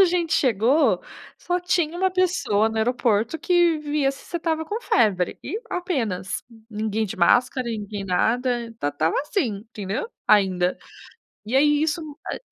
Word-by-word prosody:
a 385 Hz, -, +8 dB
gente 340 Hz, -2 st, 0 dB
chegou, 265 Hz, -1 st, +3 dB, 0.3 s
só 355 Hz, 0 st, -2 dB
tinha 350 Hz, -2 st, 0 dB
uma 380 Hz, +1 st, +2 dB
pessoa 360 Hz, -, +1 dB
no 220 Hz, -, -3 dB
aeroporto 230 Hz, +2 st, +1 dB
que 345 Hz, 0 st, +3 dB
via 295 Hz, -2 st, 0 dB
se 275 Hz, -, -12 dB
você 345 Hz, -, -4 dB
estava 320 Hz, -1 st, -1 dB
com 420 Hz, +8 st, -4 dB
febre, 205 Hz, -, +1 dB
e 430 Hz, -, -4 dB
apenas. 230 Hz, -, -2 dB, 0.3 s
Ninguém 215 Hz, 0 st, -1 dB
de 210 Hz, -, -5 dB
máscara, 245 Hz, +7 st, +3 dB
ninguém 210 Hz, -3 st, -4 dB
nada, 235 Hz, +7 st, +1 dB, 0.2 s
esta 225 Hz, -10 st, -3 dB
estava 155 Hz, +3 st, 0 dB
assim, 290 Hz, -, -1 dB
entendeu, 210 Hz, -, -4 dB, 0.2 s
ainda. 185 Hz, -3 st, +3 dB, 0.7 s
E 230 Hz, +5 st, -1 dB
aí 295 Hz, +1 st, +4 dB
isso, 315 Hz, +1 st, 0 dB, 0.3 s
ah -, -, -3 dB
255 Hz, 155 wpm, -23 LUFS, 210-330 Hz, 0.7 s, a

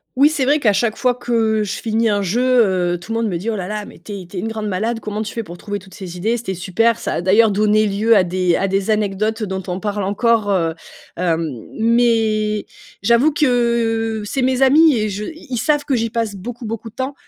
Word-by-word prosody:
Oui, 285 Hz, +3 st, +5 dB
c'est 280 Hz, -4 st, -1 dB
vrai 290 Hz, +3 st, +3 dB
qu'à 210 Hz, -6 st, +3 dB
chaque 215 Hz, +2 st, 0 dB
fois 250 Hz, 0 st, +2 dB
que, 245 Hz, 0 st, -7 dB, 0.3 s
heu, -, -, +1 dB
je 200 Hz, -, -3 dB
finis 225 Hz, 0 st, 0 dB
un 205 Hz, -1 st, +1 dB
jeu, 215 Hz, +7 st, 0 dB, 0.5 s
heu, -, -, -6 dB
tout 200 Hz, +6 st, -10 dB
le 230 Hz, -, 0 dB
monde 230 Hz, -, 0 dB
me 175 Hz, -, -2 dB
dit: 210 Hz, +7 st, -4 dB
«Oh -, -, -2 dB
là 185 Hz, -2 st, -4 dB
là, 210 Hz, 0 st, -4 dB
mais -, -, -14 dB
tu 210 Hz, -, -8 dB
es -, -, -11 dB
tu 180 Hz, +2 st, -10 dB
es -, -, -1 dB
une 220 Hz, -, -3 dB
grande 220 Hz, -1 st, -4 dB
malade, 220 Hz, +5 st, -1 dB
comment 210 Hz, 0 st, -4 dB
tu 210 Hz, -, -4 dB
fais 230 Hz, -, -4 dB
pour 175 Hz, -2 st, -11 dB
trouver 205 Hz, -1 st, -4 dB
toutes 190 Hz, 0 st, -15 dB
ces 180 Hz, -2 st, -8 dB
idées? 225 Hz, +6 st, 0 dB
C'était 190 Hz, -5 st, -4 dB
super!» 210 Hz, +6 st, +1 dB
ça -, -, -3 dB
a -, -, -1 dB
d'ailleurs 210 Hz, +4 st, +4 dB
donné 215 Hz, +1 st, +3 dB
lieu 215 Hz, +3 st, +2 dB
à 185 Hz, -, +4 dB
des 180 Hz, -1 st, +1 dB
à 195 Hz, -, 0 dB
des 195 Hz, +2 st, -1 dB
anecdotes, 215 Hz, +1 st, 0 dB
heu, -, -, -2 dB
dont 190 Hz, 0 st, -3 dB
on 180 Hz, +1 st, -3 dB
parle 205 Hz, 0 st, -2 dB
encore, 210 Hz, +2 st, +1 dB
heu, 165 Hz, -4 st, +1 dB, 0.4 s
hem. 165 Hz, -2 st, 0 dB, 0.3 s
Mais 220 Hz, -2 st, +2 dB, 0.4 s
j'avoue 235 Hz, +8 st, +4 dB
que, 235 Hz, -5 st, +1 dB
c'est 260 Hz, +5 st, -2 dB
mes 260 Hz, +1 st, +2 dB
amis 300 Hz, +2 st, +6 dB
et 215 Hz, 0 st, 0 dB
je 205 Hz, +2 st, -4 dB
ils 260 Hz, -7 st, -6 dB
savent 295 Hz, -1 st, +1 dB
que 275 Hz, -, -1 dB
j'y 230 Hz, -1 st, 0 dB
passe 225 Hz, -2 st, -2 dB
beaucoup, 235 Hz, +5 st, -7 dB
beaucoup 225 Hz, +1 st, -5 dB
de 225 Hz, -, -25 dB
temps. 265 Hz, +2 st, -3 dB
215 Hz, 255 wpm, -19 LUFS, 195-235 Hz, 0.5 s, amis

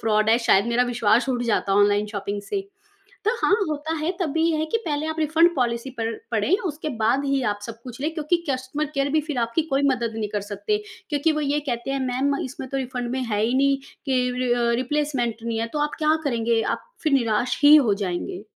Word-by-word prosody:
Fraud 215 Hz, -1 st, +2 dB
है, 225 Hz, -, +6 dB
शायद 230 Hz, -3 st, +3 dB
मेरा 235 Hz, +1 st, +2 dB
विश्वास 240 Hz, 0 st, +2 dB
उठ 245 Hz, -2 st, 0 dB
जाता 210 Hz, -4 st, +1 dB
ऑनलाइन 205 Hz, +1 st, +3 dB
शॉपिंग 205 Hz, -1 st, -4 dB
से। 395 Hz, -, -2 dB, 0.6 s
तो 430 Hz, -, +3 dB
हाँ, 395 Hz, -, +5 dB, 0.2 s
होता 305 Hz, +2 st, -2 dB
है, 315 Hz, +3 st, -1 dB
तब 335 Hz, -5 st, 0 dB
भी 320 Hz, -, +1 dB
ये 320 Hz, -, 0 dB
है 315 Hz, -, 0 dB
कि 315 Hz, -, 0 dB
पहले 300 Hz, 0 st, -1 dB
आप 315 Hz, 0 st, -4 dB
रिफंड 320 Hz, +3 st, +4 dB
पॉलिसी 240 Hz, 0 st, -1 dB
पड़ 225 Hz, 0 st, -1 dB, 0.2 s
पढ़ें, 230 Hz, -, +2 dB
उसके 310 Hz, -1 st, -4 dB
बाद 255 Hz, +6 st, +2 dB
ही 275 Hz, -1 st, +1 dB
आप -, -, -13 dB
सब 230 Hz, -1 st, -9 dB
कुछ 250 Hz, 0 st, -9 dB
लें। 310 Hz, +3 st, -1 dB
क्योंकि 315 Hz, +2 st, +1 dB
कस्टमर 260 Hz, +3 st, -2 dB
केयर 275 Hz, 0 st, +1 dB
भी 310 Hz, -, +3 dB
फिर 290 Hz, -5 st, -2 dB
आपकी 235 Hz, +6 st, +1 dB
कोई 275 Hz, -, +2 dB
मदद 235 Hz, -3 st, -1 dB
नहीं 215 Hz, -2 st, -2 dB
कर 205 Hz, -, +1 dB
सकते। 420 Hz, -, -1 dB, 0.3 s
क्योंकि 295 Hz, +2 st, +2 dB
वो 305 Hz, -, -1 dB
ये 290 Hz, 0 st, 0 dB
कहते 240 Hz, +2 st, -3 dB
हैं, 275 Hz, 0 st, -1 dB
मैम 265 Hz, +3 st, 0 dB
इसमें 260 Hz, 0 st, -7 dB
तो 275 Hz, -, -3 dB
रिफंड 250 Hz, -2 st, -3 dB
में 260 Hz, +1 st, -2 dB
है 210 Hz, -3 st, -1 dB
ही 235 Hz, +3 st, +1 dB
नहीं 275 Hz, +1 st, +3 dB, 0.3 s
कि 260 Hz, -2 st, +2 dB, 0.2 s
रि 250 Hz, -1 st, +1 dB
अ, 240 Hz, -1 st, +2 dB
रिप्लेसमेंट 265 Hz, -4 st, -1 dB
नहीं 230 Hz, -1 st, -2 dB
है, 230 Hz, -, -1 dB
तो 300 Hz, -, -2 dB
आप 295 Hz, -, -3 dB
क्या 310 Hz, 0 st, +3 dB
करेंगे? 230 Hz, -4 st, +1 dB
आप -, -, -2 dB, 0.2 s
फिर 310 Hz, -, +1 dB
निराश 240 Hz, -2 st, +1 dB
ही 295 Hz, +1 st, +9 dB
हो 240 Hz, -9 st, +4 dB
जाएँगे। 180 Hz, +2 st, -4 dB
255 Hz, 235 wpm, -24 LUFS, 230-295 Hz, 0.6 s, ही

